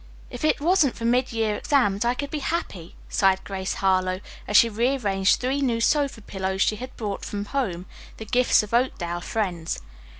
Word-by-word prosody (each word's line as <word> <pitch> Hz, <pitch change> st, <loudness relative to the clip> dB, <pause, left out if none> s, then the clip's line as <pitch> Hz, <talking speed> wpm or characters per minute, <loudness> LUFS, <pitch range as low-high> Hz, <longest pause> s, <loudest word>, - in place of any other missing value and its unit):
If 245 Hz, -, -7 dB
it 310 Hz, -, +2 dB
wasn't 315 Hz, -3 st, +3 dB
for 230 Hz, -, -5 dB
mid 250 Hz, +2 st, +2 dB
year 220 Hz, -2 st, 0 dB
exams, 230 Hz, -8 st, +1 dB
I 240 Hz, +1 st, +2 dB
could 285 Hz, +1 st, -5 dB
be 305 Hz, -, -2 dB
happy," 200 Hz, -, -4 dB
sighed 190 Hz, -1 st, +2 dB
Grace 190 Hz, -1 st, -4 dB
Harlowe, 185 Hz, -1 st, +1 dB, 0.3 s
as 210 Hz, -, +4 dB
she 235 Hz, -, +7 dB
rearranged 215 Hz, -4 st, +1 dB
three 265 Hz, +3 st, -1 dB
new 240 Hz, -4 st, +1 dB
sofa 280 Hz, -1 st, +1 dB
pillows 190 Hz, -1 st, -1 dB
she 215 Hz, -, 0 dB
had 255 Hz, +4 st, -9 dB
brought 205 Hz, -3 st, -4 dB
from 205 Hz, 0 st, -4 dB
home, 200 Hz, -9 st, -2 dB, 0.3 s
the 220 Hz, -, -7 dB
gifts 245 Hz, 0 st, +3 dB
of 210 Hz, -, -9 dB
Oakdale 175 Hz, -9 st, 0 dB
friends. 175 Hz, -6 st, -2 dB
220 Hz, 185 wpm, -24 LUFS, 195-255 Hz, 0.3 s, she